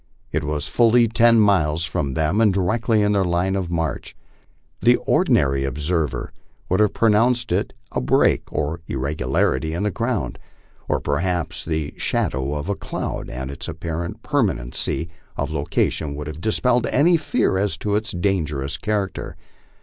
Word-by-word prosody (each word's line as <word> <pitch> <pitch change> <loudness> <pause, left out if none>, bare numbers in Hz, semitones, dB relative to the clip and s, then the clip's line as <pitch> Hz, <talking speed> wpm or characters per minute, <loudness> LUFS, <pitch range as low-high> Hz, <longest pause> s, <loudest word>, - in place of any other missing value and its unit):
It - - -1
was 75 0 -2
fully 120 0 +4
ten 115 0 +5
miles 85 -6 +3
from 70 -6 -2
them 80 +7 +1
and 110 -3 +5
directly 105 +3 +1
in 105 - +2
their 100 -2 +2
line 90 +2 0
of 95 -3 -2
march. 80 -5 -3 0.6
The - - +6
ordinary 70 -1 +2
observer 75 +4 -2 0.4
would 95 - +2
have 105 -2 +3
pronounced 115 +2 +3
it - - 0 0.2
a - - -1
break 60 - +2
or 75 +3 -2
irregularity 70 +2 0
in 90 - -2
the 105 - +1
ground, 115 0 -2 0.5
or - - +1
perhaps 85 +2 -1
the 80 -2 -2
shadow 65 +2 -1
of 75 +3 -4
a 100 - +1
cloud, - - -5
and 65 +1 -5
its 70 - -7
apparent 85 +5 -5
permanency 90 - 0 0.3
of 70 +2 -2
location 75 0 -1
would 75 +1 -5
have 75 +1 -7
dispelled 120 +3 +1
any 170 +6 +4
fear 95 - +1
as 100 -4 0
to 105 +3 -2
its 110 +1 -1
dangerous 80 -7 -1
character. 105 -3 -3
85 Hz, 155 wpm, -22 LUFS, 75-105 Hz, 0.6 s, The